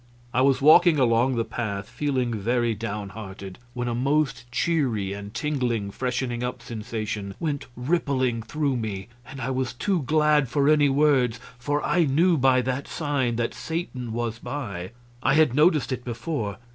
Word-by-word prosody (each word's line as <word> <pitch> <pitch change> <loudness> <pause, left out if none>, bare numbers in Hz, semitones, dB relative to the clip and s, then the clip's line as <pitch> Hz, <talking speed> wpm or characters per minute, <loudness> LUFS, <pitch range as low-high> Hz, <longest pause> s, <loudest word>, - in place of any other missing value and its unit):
I 130 - +3
was 135 0 +3
walking 160 +2 +7
along 125 0 +3
the 115 -1 0
path, 105 -4 -4
feeling 130 -5 -1
very 120 +2 0
down 105 -1 -4
hearted, 100 -3 -9 0.2
when 125 0 -2
a 120 - -1
most 130 -1 0
cheery 125 - 0
and 100 0 -7
tingling 120 -7 -1
freshening 125 0 -2
up 125 +1 -4
sensation 110 -3 -5
went 150 -3 -2
rippling 130 -4 0
through 140 +3 -1
me, 105 -2 -4 0.2
and 135 - -9
I 130 +1 -2
was 130 -2 -1
too 180 +7 0
glad 150 -1 +3
for 140 +2 +2
any 150 -1 +5
words, 135 -4 +3 0.2
for 145 +4 -1
I 175 -2 +3
knew 165 +6 +3
by 130 -3 +3
that 130 +2 -2
sign 140 -7 -1
that 120 0 -1
Satan 150 -8 -4
was 115 0 -3
by. 100 -13 -5 0.3
I 135 - +3
had 155 -5 +4
noticed 150 0 +3
it 125 -1 -3
before. 120 - -3
125 Hz, 165 wpm, -25 LUFS, 115-145 Hz, 0.3 s, walking